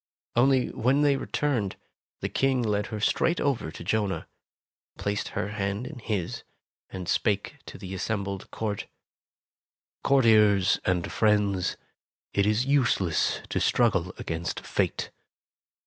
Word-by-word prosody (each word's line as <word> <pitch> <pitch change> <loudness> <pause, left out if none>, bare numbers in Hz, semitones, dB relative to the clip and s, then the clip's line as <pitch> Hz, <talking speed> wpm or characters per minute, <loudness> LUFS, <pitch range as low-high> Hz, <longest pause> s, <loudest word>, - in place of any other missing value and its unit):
Only 130 +1 +3
when 130 +5 +2
they 145 -1 +4
returned, 130 -7 -1 0.5
the - - 0
King 135 -2 +1
led 105 -2 0
her 110 - -5
straight 165 +10 +2
over 140 - 0
to 80 - -9
Jonah, 105 +1 -1 0.7
placed 100 +1 -2
her 100 - -1
hand 100 +2 -2
in 140 -1 -8
his, 105 -6 -3 0.5
and 95 -2 -6
spake 105 +9 0
to - - -8
the 95 -1 -7
assembled 100 0 -3
court: 105 -2 -3 1.2
"Courtiers 105 -7 +5
and 90 -2 0
friends, 105 -4 +2 0.6
it 100 0 +2
is 110 +4 +2
useless 120 - +2
to - - 0
struggle 95 -7 +2
against 85 +1 -4
Fate. - - -1
105 Hz, 125 wpm, -27 LUFS, 95-125 Hz, 1.2 s, Courtiers